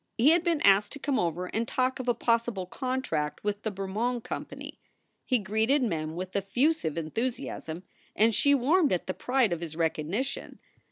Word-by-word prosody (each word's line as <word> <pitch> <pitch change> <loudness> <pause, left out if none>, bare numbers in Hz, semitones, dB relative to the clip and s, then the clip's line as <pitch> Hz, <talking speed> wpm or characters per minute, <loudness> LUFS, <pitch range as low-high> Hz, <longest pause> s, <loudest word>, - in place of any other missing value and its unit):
He 265 +7 +6
had 340 0 +4
been 335 -4 +1
asked 200 +1 +4
to - - -6
come 275 -1 0
over 175 +1 -1
and 225 +5 -2
talk 255 +1 0
of 255 - -5
a 240 - +3
possible 230 -5 0
contract 220 - -2
with 205 0 -1
the 220 - -2
Bermond 215 +5 -2
Company. - - -7 0.5
He 255 - +3
greeted 220 +7 +1
Mem 160 -7 -2
with 185 +1 -6
effusive 220 - +1
enthusi 225 - -2
asm, 165 +3 -6 0.3
and 225 +2 +4
she 285 +7 +4
warmed 295 +5 +3
at 180 - 0
the 185 - -2
pride 250 -5 +1
of 170 - -4
his 165 -2 -6
recognition. 165 - -2
220 Hz, 180 wpm, -28 LUFS, 180-260 Hz, 0.5 s, He